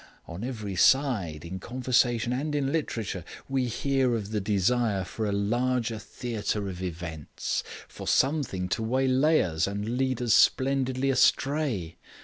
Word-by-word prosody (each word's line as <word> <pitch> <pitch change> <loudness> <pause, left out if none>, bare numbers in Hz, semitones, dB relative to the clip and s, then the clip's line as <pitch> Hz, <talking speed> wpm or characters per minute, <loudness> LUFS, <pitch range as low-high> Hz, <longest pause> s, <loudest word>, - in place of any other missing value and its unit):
On 85 +5 -7
every 110 -6 -4
side, 95 - +2
in 95 +3 -6
conversation 120 0 +1
and 145 +4 -2
in 140 -2 0
literature, 115 - -2 0.2
we 135 -2 0
hear 130 +1 +1
of 105 -2 -4
the 105 -2 -1
desire 105 +1 +1
for 110 +4 -4
a - - 0
larger 115 +3 0
theatre 105 -3 -3
of 90 -1 -6
events 80 -4 -4 0.2
for - - -9
something 135 -11 +1
to - - -1
waylay 130 +6 +3
us 80 -1 0
and 105 +4 -3
lead 130 -2 0
us 120 -3 +2
splendidly 130 0 +3
astray. 135 - +1
120 Hz, 140 wpm, -27 LUFS, 100-130 Hz, 0.2 s, waylay